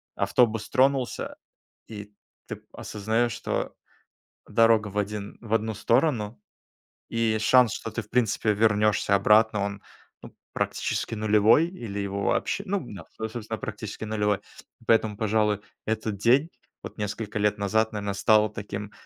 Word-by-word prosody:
автобус 115 -3 +1
тронулся, 135 -1 +1 0.5
и 105 -1 -9 0.3
ты - - -7
осознаёшь, 110 +3 -1
что - - -3 0.7
дорога 115 -1 +4
в 105 0 -7
один 105 0 -3
в 115 -2 -5
одну 110 0 +1
сторону, 115 0 +1 0.7
и 115 -1 0
шанс, 120 0 +5
что 115 - -5
ты 115 - -3
в 105 - -23
принципе 115 -3 +1
вернёшься 105 -1 +2
обратно, 105 +1 +4
он, 100 0 -4 0.4
ну - - -13 0.2
практически - - -2
нулевой, 110 +8 +4
или 115 - -6
его 100 0 -3
вообще 200 - 0
ну 200 +1 0
да, 100 - -9
со 110 - -3
собственно 110 -1 -5
практически 110 0 -6
нулевой. 105 -2 0 0.5
Поэтому, 110 -2 +3
пожалуй, 105 -1 +1 0.2
этот 110 -1 -2
день, 125 - +3 0.3
вот - - -9
несколько 105 0 -4
лет 105 0 +1
назад, 110 +2 +1
наверно, 100 -1 -3
стал 105 +1 +3
таким 105 -1 -6
110 Hz, 140 wpm, -26 LUFS, 105-115 Hz, 0.7 s, шанс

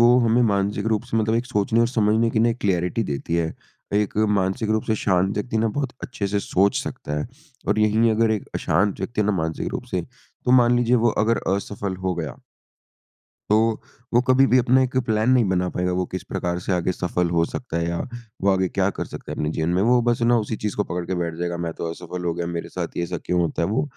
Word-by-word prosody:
वो 120 +1 +6
हमें 115 +2 +3
मानसिक 100 +1 0
रूप 110 -1 +1
से 120 -2 -3
मतलब 110 0 +1
एक 120 +2 0
सोचने 110 -1 +1
और 115 - +3
समझने 110 -1 +2
की 110 - 0
ना 115 - +4
एक 115 - -1
क्लैरिटी 90 +2 0
देती 70 +4 -3
है। 80 -1 -1 0.4
एक 105 -1 0 0.2
मानसिक 100 +4 0
रूप 110 0 +1
से 110 - +1
शांत 95 0 +1
व्यक्ति 110 +2 -2
ना 115 - +2
बहुत 135 -3 -2
अच्छे 105 -5 -3
से 100 +1 0
सोच 100 +1 +1
सकता 75 +1 -4
है - - -3 0.4
और - - +2
यहीं 110 +2 +3
अगर 110 +1 +2
एक 110 -3 -2
अशांत 100 +2 +1
व्यक्ति 105 +3 -2
है - - +2
ना, 105 - +2
मानसिक 80 -3 -2
रूप - - -4
से - - -1 0.4
तो 125 - +1
मान 120 0 +4
लीजिए 120 +1 +3
वो - - +5 0.2
अगर 115 +1 +2 0.2
असफल 100 -1 -4
हो 90 - +1
गया 80 -3 -5 1.1
तो 110 +1 +3 0.3
वो 120 - +6
कभी 130 +1 +5
भी 130 - +4
अपना 130 +2 +4
एक 130 0 -3
प्लान 110 +1 +1
नहीं 130 -2 +5
बना 90 -1 +1
पाएगा। 90 0 -1
वो 90 0 0
किस 95 - -4
प्रकार 90 -2 -3
से 95 - -4
आगे 90 +1 +1
सफल 90 -1 -1
हो 85 -1 +2
सकता 110 -5 -5
है 85 0 -1
या 85 - -2 0.4
वो 100 - +3
आगे 95 -1 +2
क्या 100 0 +1
कर - - -2
सकता - - -8
है - - -4
अपने 75 - -1
जीवन 80 +1 -1
में, 90 +2 +2
वो 120 +3 +4
बस 120 0 +1
है 115 - +3
ना, 120 0 +5
उसी 110 0 -2
चीज़ 105 -1 -3
को 105 - +1
पकड़ 90 0 -4
के 95 - -2
बैठ 85 -2 -2
जाएगा। 85 0 -3
मैं 85 -1 -3
तो 85 - -3
असफल 90 +1 -6
हो 85 - +1
गया, 85 0 -3
मेरे 85 -1 -4
साथ - - -3
ये - - 0
ऐसा 85 - -3
क्यों 90 - +1
होता 85 0 -1
है? - - +1
वो 105 +7 +1
100 Hz, 255 wpm, -23 LUFS, 90-115 Hz, 1.1 s, वो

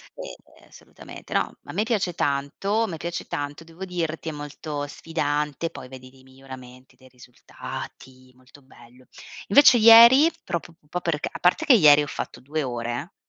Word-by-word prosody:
Ehm - - -13
assolutamente, - - -13
no, - - 0
a - - -9
me 210 - -1
piace 215 -6 -2
tanto, 150 +10 -2
a 225 - -2
me 165 -4 -6
piace 170 +2 -6
tanto. 145 +2 -6
Devo 165 +3 -10
dirti 165 -3 -4
è - - -4
molto 145 0 -7
sfidante. 150 +1 -3
Poi 130 - -11
vedi 130 0 -13
dei 135 - -21
miglioramenti, 130 -1 -14
dei 130 - -20
risultati, 130 +1 -11
molto 130 +3 -20
bello. 125 -1 -20 0.4
Invece 255 +3 +6
ieri 235 +8 +8
proprio 170 -1 -5
p - - -38
un 150 - -30
po' 180 +3 -4
perché 160 -4 -2
a - - -9
parte 180 - +1
che 285 - +6
ieri 150 -8 +6
ho - - -6
fatto 120 - -7
2 150 +5 -4
ore, 120 - -5
150 Hz, 175 wpm, -23 LUFS, 130-180 Hz, 0.4 s, ieri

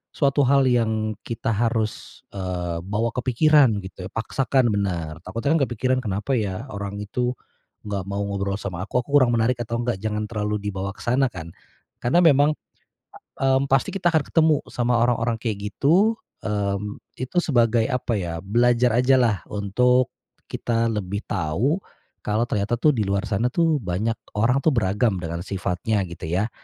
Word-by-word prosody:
suatu 140 -1 +2
hal 140 0 +4
yang 110 -3 +1
kita 115 -1 -3
harus, 110 0 -2
eee, 90 -3 -3
bawa 105 +6 -1
ke 125 - -2
pikiran 145 +2 +5
gitu, 95 -1 -8
paksakan, 120 +3 0
benar, 85 -6 -2
takutnya 115 - -1
kan 165 - +2
kepikiran, 130 +2 0
"Kenapa 105 +5 -2
ya 105 -1 -1
orang 100 0 -5
itu 120 +5 -2 0.5
nggak 100 -2 -2
mau 100 +1 -2
ngobrol 100 0 -2
sama 90 -4 -5
aku? 125 +3 0
Aku 140 - -11
kurang 135 -4 +6
menarik 115 +2 +1
atau 115 0 -3
enggak?" 120 -4 -2
Jangan 105 -1 -2
terlalu 105 -1 -2
dibawa 100 -1 -3
ke - - -11
sana 130 +3 +3
kan, 85 -6 -9 0.5
karena 170 +9 +3
memang, 145 -2 +6 0.9
mmm, 135 +1 +2
pasti 135 - +3
kita 175 -3 +2
akan 160 - +4
ketemu 160 -2 +3
sama 120 -1 +1
orang-orang 120 -1 +1
kayak 105 -3 -3
gitu, 200 +10 +3 0.3
mmm, 105 -1 -2 0.2
itu 130 +7 -6
sebagai 120 -7 +2
apa 125 -1 -1
ya, 85 -2 -4
belajar 120 +3 +3
aja 130 +1 +4
lah 115 -6 +2
untuk 125 +5 +2 0.4
kita 115 -1 0
lebih 100 0 -3
tahu, 95 - 0 0.4
kalau 110 +2 0
ternyata 105 0 -1
tuh 150 +6 +3
di 115 -6 0
luar 100 0 0
sana 115 +3 0
tuh 160 +2 +1
banyak 105 +3 -2 0.2
orang 120 +6 +3
tuh 150 +1 +2
beragam 105 -1 +1
dengan 85 0 -4
sifatnya 100 +2 -1
gitu 85 -2 -8
ya. 95 +7 0
115 Hz, 165 wpm, -23 LUFS, 100-125 Hz, 0.9 s, kurang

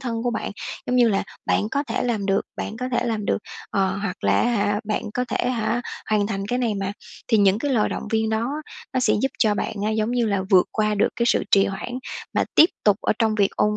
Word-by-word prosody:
thân 230 -3 -3
của 245 - 0
bạn, 220 - -3 0.4
giống 250 - +1
như 240 -2 +5
là 195 - +1 0.2
"Bạn 210 - +1
có 280 +1 0
thể - - -2
làm 220 -5 -1
được, 195 0 +2 0.2
bạn 215 - -4
có 250 +2 -3
thể - - +1
làm 220 -3 -1
được", - - +1 0.3
ờ, 195 -1 +1
hoặc 200 -1 -4
là - - +4
á 240 - +2
hả, 205 -2 +1
bạn 210 0 -2
có 250 - 0
thể, - - 0
hả, 235 0 0 0.3
hoàn 210 -1 +2
thành 195 -2 -3
cái 245 +3 -1
này 230 -4 0
mà. 195 0 -2 0.4
Thì 225 - +4
những 200 0 +4
cái 285 +3 -1
lời 225 -5 +2
động - - -5
viên 220 0 +1
đó 230 +4 0 0.4
nó 255 - +1
sẽ - - +3
giúp 270 - +3
cho 215 -2 +3
bạn 205 - -2
á, 215 - +1
giống 220 +1 0
như 245 -2 +1
là, 200 -3 0
vượt 185 -2 +6
qua 215 -1 +1
được 205 - +3
cái 235 - +1
sự - - +2
trì 195 -1 +6
hoãn 240 +6 -4 0.4
mà - - +2
tiếp 325 - +7
tục 205 -2 +5
ở - - +2
trong 220 -2 +2
việc 200 -2 +2
ôn 210 0 +2
220 Hz, 260 wpm, -23 LUFS, 205-240 Hz, 0.4 s, tiếp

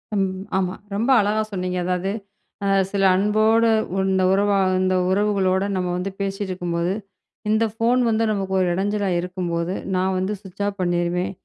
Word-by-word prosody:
அம் 195 -1 +2 0.3
ஆமா 185 -1 -1 0.2
ரொம்ப 230 +6 0
அழகா 210 +2 0
சொன்னீங்க 180 -2 -2
அதாவது, 185 +2 -1 0.5
அ - - +1 0.2
சில 200 -1 0
அன்போட 215 +3 +3 0.5
இந்த 190 0 +2
உறவா 200 0 +2 0.2
இந்த 185 0 +2
உறவுகளோட 195 -1 +2
நம்ம 180 -1 -1
வந்து 190 +2 -3
பேசிட்டு 195 0 -3
இருக்கும்போது, 175 0 -1 0.6
இந்த 220 +1 +3 0.2
போன் 240 +2 +3
வந்து 225 0 +1
நமக்கு 195 -2 -2
ஒரு 185 - +2
எடஞ்சலா 200 +1 0
இருக்கும்போது, 175 -1 -2 0.2
நா 185 - +1
வந்து 190 +3 -1
சுவிட்ச் 195 0 -7
ஆஃப் 200 -1 -5
பண்ணீருவேன். 175 +1 0
190 Hz, 150 wpm, -22 LUFS, 180-205 Hz, 0.6 s, அன்போட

